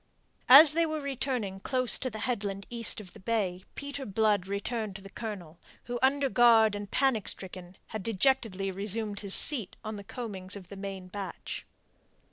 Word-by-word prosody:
As 290 +3 +10
they 335 +1 +2
were 310 0 -3
running 260 -8 -3
close 255 +4 +2
to 255 - -2
the 220 - -8
headland 200 -5 -3
east 230 -2 0
of 190 -4 -11
the - - -13
bay, 190 -3 -2
Peter 285 0 -6
Blood 210 -3 0
returned 205 +1 -4
to 195 - -8
the 195 - -12
Colonel, 180 -8 -7 0.2
who, 245 -1 -5
under 275 +1 +2
guard 230 -4 +5
and 205 -1 -6
panic 260 -5 +1
stricken, 185 -1 -7
had 220 - -5
dejectedly 205 -2 0
resumed 205 +2 -2
his 200 -2 +4
seat 235 -10 +5
on 215 0 -5
the 200 - -9
coamings 200 -4 -5
of 185 -3 -11
the 200 - -9
main 195 -1 -7
batch. 190 -1 -7
210 Hz, 175 wpm, -29 LUFS, 195-245 Hz, 0.2 s, As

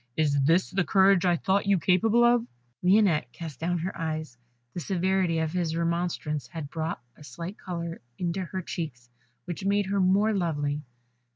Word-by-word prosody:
Is 145 -3 +2
this 165 +7 +3
the 190 0 +1
courage 190 0 +4
I 175 -1 +4
thought 195 +3 +1
you 200 -1 +4
capable 185 +9 +3
of?" 240 0 +4 0.3
Lionette 180 - +3
cast 160 -4 -8
down 175 +2 0
her 175 +3 -3
eyes: 155 -4 -4 0.4
the - - -4
severity 185 -1 +1
of 160 0 -1
this 170 -3 -1
remonstrance 170 -5 -1
had 160 -3 -7
brought 160 +1 -3 0.2
a - - -15
slight 170 +6 -7
colour 170 -2 -5 0.2
into 180 +1 -2
her 185 +1 -5
cheeks, 125 -9 -6 0.3
which 175 +3 -5
made 200 +1 +2
her 200 +1 0
more 195 +4 +3
lovely. 150 -6 -1
175 Hz, 170 wpm, -27 LUFS, 160-190 Hz, 0.4 s, courage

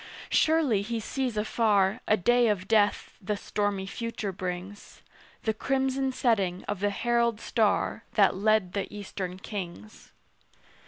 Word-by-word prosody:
Surely 310 -10 +3
he 225 +3 -3
sees 250 0 -3
afar 210 0 +2
A 215 - +4
day 240 +5 +3
of 195 -3 0
death 210 -2 +2
the 205 +1 -2
stormy 200 -1 -2
future 220 0 -4
brings; 185 +2 -7 0.4
The 220 - +1
crimson 265 +2 0
setting 200 -8 0
of 205 - -4
the 205 +1 +1
herald 235 +1 +1
star 220 -3 0
That 200 -2 +4
led 205 -2 +2
the 200 -1 -3
Eastern 190 -3 -5
kings. 175 - -8
210 Hz, 130 wpm, -28 LUFS, 195-235 Hz, 0.4 s, A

